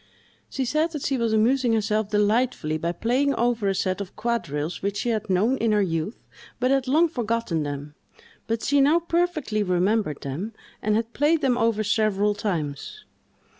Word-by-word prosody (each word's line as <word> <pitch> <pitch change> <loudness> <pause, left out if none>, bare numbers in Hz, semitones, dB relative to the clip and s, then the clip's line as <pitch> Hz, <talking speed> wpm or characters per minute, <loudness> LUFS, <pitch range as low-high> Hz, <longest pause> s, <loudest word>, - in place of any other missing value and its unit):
She 265 - -2
said 310 +6 0
that 300 - -4
she 275 - 0
was 230 -1 +1
amusing 235 +3 +3
herself 215 -1 0
delightfully 210 -6 +1
by 170 +1 -1
playing 255 +9 +1
over 235 -3 +1
a 195 - +1
set 185 +1 -1
of 195 - -8
quadrilles 170 -9 -2
which 200 +1 -2
she 240 - -1
had 220 -4 -2
known 210 +8 +2
in 225 -3 +1
her 210 - +3
youth, 165 +4 -3 0.3
but 255 +1 +2
had 270 -1 +1
long 315 +6 +4
forgotten 230 - -1
them; 145 0 -5 0.5
but 225 0 -2
she 285 +1 +3
now 295 +5 +5
perfectly 335 -9 0
remembered 185 -3 0
them, 165 +12 -5 0.3
and 210 0 +1
had 225 +1 -2
played 305 +3 +2
them 265 -4 +2
over 225 -2 +1
several 210 -1 +1
times. 165 -9 -4
220 Hz, 175 wpm, -24 LUFS, 195-255 Hz, 0.5 s, now